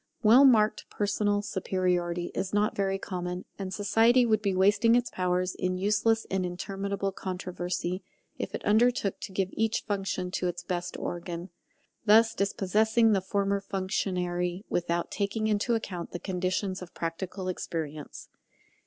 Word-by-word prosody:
Well 240 +6 +8
marked 215 -5 +4
personal 205 0 0
superiority 180 -3 -1
is 190 +1 -2
not 210 +1 +2
very 195 -1 0
common; 180 -1 -4
and 190 -1 -4
society 225 +5 +4
would 215 -2 +2
be 200 -3 0
wasting 205 +5 +4
its 245 0 +1
powers 180 0 0
in 185 0 -2
useless 215 +3 +2
and 190 -1 +1
interminable 195 +2 -3
controversy 180 -1 -4 0.3
if - - -4
it - - -6
undertook 220 -1 +2
to 200 - -7
give 190 0 -1
each 225 0 0
function 195 -3 -2
to 180 - -1
its 175 0 -4
best 180 -1 -3
organ, 175 +1 -5 0.5
thus 225 +1 +6
dispossessing 220 +3 +2
the 195 -2 +3
former 200 +1 0
functionary 180 -2 -2
without 170 0 -1
taking 205 +2 -1
into 215 +2 +1
account 185 -6 -5
the 175 - -3
conditions 185 +1 -2
of 180 - -10
practical 185 +3 -4
experience. 155 -4 -5
195 Hz, 145 wpm, -28 LUFS, 180-210 Hz, 0.5 s, Well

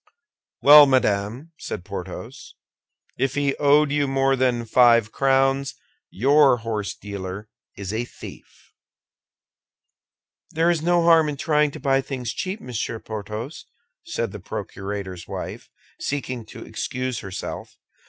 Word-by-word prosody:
"Well, 145 0 +10
madame," 125 +3 0
said 90 - -6
Porthos, 95 -2 -8 0.6
"if 135 0 0
he 140 -1 +1
owed 145 0 +4
you 145 -1 +1
more 135 0 +2
than 125 -2 0
five 115 -2 +4
crowns, 135 0 +1 0.3
your 140 +3 +4
horsedealer 100 -3 -5 0.3
is 100 0 -5
a 115 +2 -1
thief." - - -13 1.8
"There 165 +2 +2
is 165 -3 -1
no 175 +1 +2
harm 165 -2 +5
in 145 - -4
trying 150 0 +2
to - - -9
buy 135 -1 +2
things 130 -4 -5
cheap, 190 +3 -4
Monsieur 120 - -4
Porthos," 110 +6 -7 0.4
said - - -3
the - - -8
procurator's 95 -3 -6
wife, - - -7 0.3
seeking 130 -5 -4
to - - -10
excuse 130 -2 -3
herself. 95 -1 -7
130 Hz, 125 wpm, -23 LUFS, 105-145 Hz, 1.8 s, Well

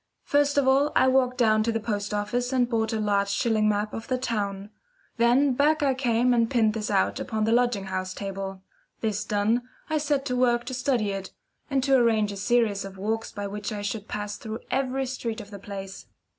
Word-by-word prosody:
First 285 0 +2
of 280 -2 +3
all 275 +3 +4
I 260 - +5
walked 255 -1 +2
down 215 -3 +4
to 230 +2 +1
the 225 - -1
post 210 -2 -3
office 210 +5 -1
and 255 -2 +3
I - - -16
bought 225 -1 +1
a 220 - -1
large 200 -1 +1
shilling 215 0 +2
map 210 0 -1
of 225 - -6
the 255 - 0
town. 205 -5 -3 0.5
Then 250 +4 +4
back 295 +3 +2
I 275 -2 +3
came 245 -1 +2
and 230 -1 +2
pinned 225 -5 +2
this 215 -1 -3
out 195 -2 +1
upon 220 -1 -2
the 220 - +1
lodging 240 -4 +2
house 185 -1 -4
table. 195 -1 -5 0.4
This 215 -2 -1
done, 210 +3 +1 0.3
I 310 - +2
set 290 -2 0
to 250 -3 -1
work 240 -1 +2
to 260 - -5
study 250 -5 0
it, 195 -1 -5 0.4
and 270 -2 +1
to 270 0 +2
arrange 225 -4 +3
a 200 - -6
series 210 0 +1
of 195 -1 -9
walks 220 +3 -2
by 205 -1 -5
which 205 +1 -4
I 205 -1 -4
should 205 +1 -4
pass 205 0 -4
through 220 0 -6
every 265 0 0
street 235 -3 -4
of 205 - -10
the 200 - -8
place. 195 -1 -8
225 Hz, 220 wpm, -26 LUFS, 205-250 Hz, 0.5 s, I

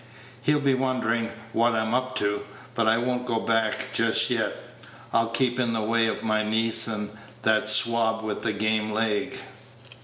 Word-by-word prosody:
He'll 150 0 +2
be 140 -2 +2
wonderin' 125 -3 0 0.2
what 115 0 +2
I'm 110 +1 -1
up 130 +1 -1
to; 105 -4 0 0.3
but 115 -2 0
I 110 +1 +4
won't 125 +1 -2
go 115 -2 0
back 115 -1 0
just - - +2
yet; - - 0 0.6
I'll 115 0 +3
keep 125 +1 +1
in 120 -2 +1
the 110 -1 -1
way 115 +1 +2
of - - -3
my 110 -1 +1
niece 115 +1 +2
and 105 -2 -3 0.3
that 110 -1 +2
swab 110 +1 +3
with 105 -1 -3
the 110 - 0
game 110 +1 0
leg." 110 -1 -1
115 Hz, 175 wpm, -25 LUFS, 110-120 Hz, 0.6 s, I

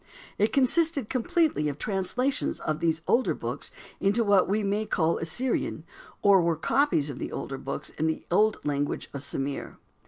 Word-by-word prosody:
It 210 +2 +3
consisted 280 -1 +3
completely 260 - +1
of 145 - -5
translations 220 - 0
of 155 0 -2
these 160 -1 0
older 255 - +2
books - - -5 0.3
into 205 +4 +2
what 200 -3 +3
we 210 +2 +1
may 205 +2 -1
call 165 -1 +1
Assyrian, 165 -1 -1 0.4
or 200 -2 +6
were 170 -1 +1
copies 160 - +1
of 130 - -9
the - - -5
older 135 -1 -5
books 140 +1 -5
in 160 - -2
the 160 - -2
old 215 +4 +3
language 145 0 -2
of 140 - -5
Sumir. 140 0 -4
195 Hz, 165 wpm, -27 LUFS, 155-235 Hz, 0.4 s, or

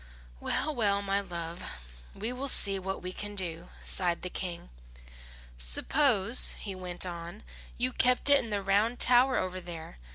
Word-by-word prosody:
"Well, 310 - -3
well, 200 -5 -1
my 200 0 -1
love, 170 -2 -8 0.5
we 220 +5 -5
will 265 +2 -5
see 195 -6 +1
what 190 0 -6
we 185 0 -5
can 205 +1 -7
do," 175 -3 -3
sighed 175 -2 -3
the 180 - -5
King. 175 - -6 0.9
"Suppose," 210 - +6
he 200 - -8
went 180 -1 -6
on, 175 +3 -9 0.3
"you 250 +1 -1
kept 250 +2 +1
it 285 -2 +5
in 230 - -9
the 205 -2 -3
round 210 +5 0
tower 255 +1 +3
over 185 0 -4
there. 165 - -10
195 Hz, 160 wpm, -28 LUFS, 180-235 Hz, 0.9 s, Suppose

